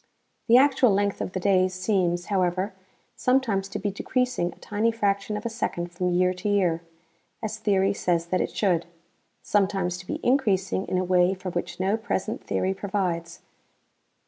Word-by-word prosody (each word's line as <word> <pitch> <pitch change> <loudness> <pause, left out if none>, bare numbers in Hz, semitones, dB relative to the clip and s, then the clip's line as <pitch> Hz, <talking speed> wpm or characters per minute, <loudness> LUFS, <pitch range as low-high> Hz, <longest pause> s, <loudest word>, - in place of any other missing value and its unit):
The 235 +1 +7
actual 265 -2 +5
length 200 0 0
of 185 - -4
the 185 - -1
days 185 -1 +2
seems, 185 -3 0
however, 185 0 0 0.4
sometimes 230 -7 +1
to - - -4
be 205 0 -2
decreasing 250 -3 -1
a - - -18
tiny 215 +2 0
fraction 205 -1 -1
of 210 - -8
a - - 0
second 175 -6 -3
from 180 +1 -1
year 180 +1 +2
to 185 +3 -3
year, 180 -5 +2 0.6
as 215 - -3
theory 195 -1 +2
says 170 -4 0
that 185 +2 0
it - - -1
should; 175 -5 0 0.6
sometimes 195 -3 0
to 180 - -12
be - - -3
increasing 200 -8 +1
in 185 - 0
a 185 - +1
way 180 +1 +3
for 185 -1 -6
which 175 +1 -4
no 195 +3 +1
present 220 -4 -3
theory 190 +1 0
provides. 190 -4 -3
195 Hz, 170 wpm, -26 LUFS, 180-210 Hz, 0.6 s, The